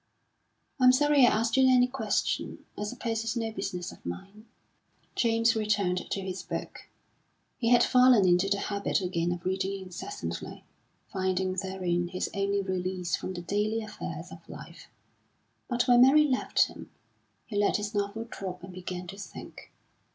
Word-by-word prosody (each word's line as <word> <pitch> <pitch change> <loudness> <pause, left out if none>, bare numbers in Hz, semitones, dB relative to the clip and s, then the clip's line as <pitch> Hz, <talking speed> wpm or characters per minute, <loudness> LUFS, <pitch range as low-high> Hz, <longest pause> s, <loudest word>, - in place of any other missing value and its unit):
"I'm 255 -1 +7
sorry 285 -1 +5
I - - +6
asked 225 +3 +1
you 260 -1 +6
any 250 -1 +6
question. 255 +2 -2
I 210 - -4
suppose 225 0 -3
it's 225 +2 -2
no 225 -1 -2
business 180 -4 -4
of - - -16
mine." 195 - -8 0.7
James 230 0 +2
returned 205 -4 0
to 195 - -2
his 190 0 -4
book; - - -6 0.7
he 230 - +1
had 240 -1 +6
fallen 250 -6 +5
into 180 +2 +3
the 200 - +2
habit 200 -1 -1
again 175 -2 -1
of 175 0 -5
reading 190 +1 -1
incessantly, 190 - -6 0.5
finding 185 -1 0
therein 185 -2 -1
his 185 +1 -3
only 200 0 0
release 185 -2 -2
from 185 - -5
the 175 - -6
daily 210 +4 0
affairs 215 - -7
of - - -13
life; - - -11 0.8
but 245 0 +1
when 245 -1 +6
Mary 280 +4 +7
left 265 -4 +2
him, - - -11 0.6
he 215 - -8
let 205 0 +3
his 210 +1 -4
novel 205 +2 -2
drop 185 -5 -7
and 185 0 -9
began 180 0 -6
to 195 +3 -9
think. 200 - -10
200 Hz, 160 wpm, -29 LUFS, 185-230 Hz, 0.8 s, I'm